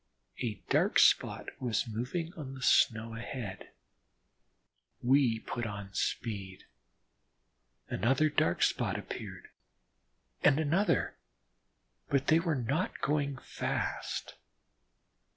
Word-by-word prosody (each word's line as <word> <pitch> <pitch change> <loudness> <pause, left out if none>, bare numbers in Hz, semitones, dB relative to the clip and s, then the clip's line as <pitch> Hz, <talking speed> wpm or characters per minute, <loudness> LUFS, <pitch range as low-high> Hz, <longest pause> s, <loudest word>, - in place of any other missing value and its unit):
A 115 -4 -2
dark - - +3
spot - - +4
was 125 0 0
moving 125 +10 -3
on 135 -4 -7
the 130 - -9
snow 115 -1 +3
ahead. 115 -4 -6 1.3
We 125 -3 +3
put 120 -1 -3
on 100 -1 -7
speed. 100 -5 -3 1.2
Another 130 +10 +2
dark 90 - +2
spot - - +1
appeared, - - -7 0.9
and 135 - +5
another, 170 +7 +1 0.9
but 140 0 +2
they 160 +1 +6
were 165 -2 0
not 135 +8 -1
going 140 -2 0
fast. - - -3
125 Hz, 100 wpm, -31 LUFS, 110-145 Hz, 1.3 s, they